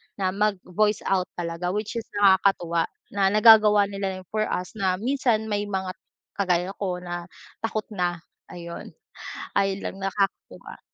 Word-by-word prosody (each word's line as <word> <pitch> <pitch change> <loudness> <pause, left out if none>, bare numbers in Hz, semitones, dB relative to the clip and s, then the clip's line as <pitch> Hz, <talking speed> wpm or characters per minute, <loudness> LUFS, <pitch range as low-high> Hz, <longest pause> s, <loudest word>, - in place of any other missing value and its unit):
na 190 -2 0
mag-voice 210 0 0
out 185 -2 +1
talaga, 175 +2 -3
which 215 +2 -2
is 225 - -9
nakakatuwa 190 -4 +3 0.2
na 195 -1 +2
nagagawa 210 0 +7
nila 195 -1 -3
yon 185 - -10
for 215 0 0
us 180 - -3
na 190 -2 +2
minsan 235 +1 +1
may 205 0 -1
mga 190 -2 -2 0.5
kagaya 180 -1 +1
ko 180 -2 -3
na 175 0 -5 0.3
takot 220 -1 -2
na, 175 -4 -2 0.2
ayon. 170 -1 -9 0.6
Ayon 195 0 0
lang - - -4
nakakatuwa. 195 0 -3
195 Hz, 145 wpm, -25 LUFS, 180-210 Hz, 0.6 s, nagagawa